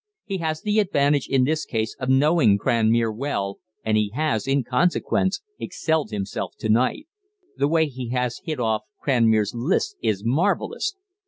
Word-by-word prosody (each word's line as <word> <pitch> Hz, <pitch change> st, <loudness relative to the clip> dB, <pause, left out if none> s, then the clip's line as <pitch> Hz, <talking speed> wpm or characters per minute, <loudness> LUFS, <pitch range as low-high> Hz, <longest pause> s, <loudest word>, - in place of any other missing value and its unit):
He 195 Hz, -2 st, -3 dB
has 155 Hz, -2 st, -2 dB
the 210 Hz, +1 st, +2 dB
advantage 145 Hz, -8 st, +2 dB
in 135 Hz, -1 st, +2 dB
this 155 Hz, +4 st, 0 dB
case 110 Hz, -1 st, -2 dB
of 130 Hz, -, -3 dB
knowing 130 Hz, -5 st, +4 dB
Cranmere 115 Hz, 0 st, +2 dB
well, 100 Hz, -7 st, -3 dB, 0.3 s
and 110 Hz, -1 st, +2 dB
he 105 Hz, -1 st, +1 dB
has, 145 Hz, -7 st, 0 dB
in 135 Hz, 0 st, +2 dB
consequence, 175 Hz, -, +1 dB, 0.2 s
excelled 160 Hz, -6 st, -1 dB
himself 100 Hz, -3 st, -4 dB
to 110 Hz, -, -4 dB
night. 125 Hz, -, +2 dB, 0.5 s
The 140 Hz, -, +2 dB
way 160 Hz, +1 st, +3 dB
he 130 Hz, -4 st, -6 dB
has 125 Hz, -1 st, -2 dB
hit 155 Hz, -6 st, -4 dB
off 110 Hz, -2 st, +1 dB, 0.2 s
Cranmere's 110 Hz, -6 st, +3 dB
lisp 170 Hz, -, -1 dB
is 100 Hz, -1 st, 0 dB
marvellous. 195 Hz, -, 0 dB
130 Hz, 160 wpm, -23 LUFS, 110-155 Hz, 0.5 s, knowing